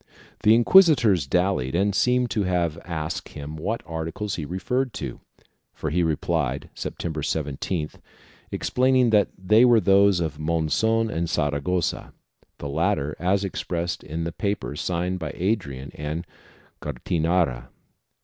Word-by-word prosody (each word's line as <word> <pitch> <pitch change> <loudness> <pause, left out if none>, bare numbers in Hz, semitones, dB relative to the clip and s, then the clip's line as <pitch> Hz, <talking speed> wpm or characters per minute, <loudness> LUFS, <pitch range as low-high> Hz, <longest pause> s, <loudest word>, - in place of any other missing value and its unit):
The 110 +1 +6
inquisitors 120 - +5
dallied 90 -4 +1
and 100 +3 +2
seem 125 +4 +2
to 110 - 0
have 85 -4 0
asked 80 -3 -4
him 75 +2 -7
what 105 +9 -3
articles 80 +5 -4
he 80 - -3
referred 120 - -2
to, - - -5 0.6
for - - -3
he 90 +3 +2
replied, 80 -3 -1
September 80 -2 -4
17th, 75 +2 -3 0.5
explaining 130 -1 +2
that 105 -2 +4
they 105 +5 +4
were 120 -2 +6
those 100 -1 +4
of 80 -3 -3
Monzon 85 +9 +1
and 85 -1 -2
Saragossa, 75 +4 -1 0.4
the 70 - -6
latter 75 0 0
as 95 +4 +1
expressed 85 -2 -3
in 80 +2 -4
the 85 - -3
paper 100 -6 -3
signed 90 +3 -2
by 80 -4 -5
Adrian 85 - -2
and 75 +3 -4 0.6
Gattinara. 80 -2 0
85 Hz, 130 wpm, -24 LUFS, 80-100 Hz, 0.6 s, The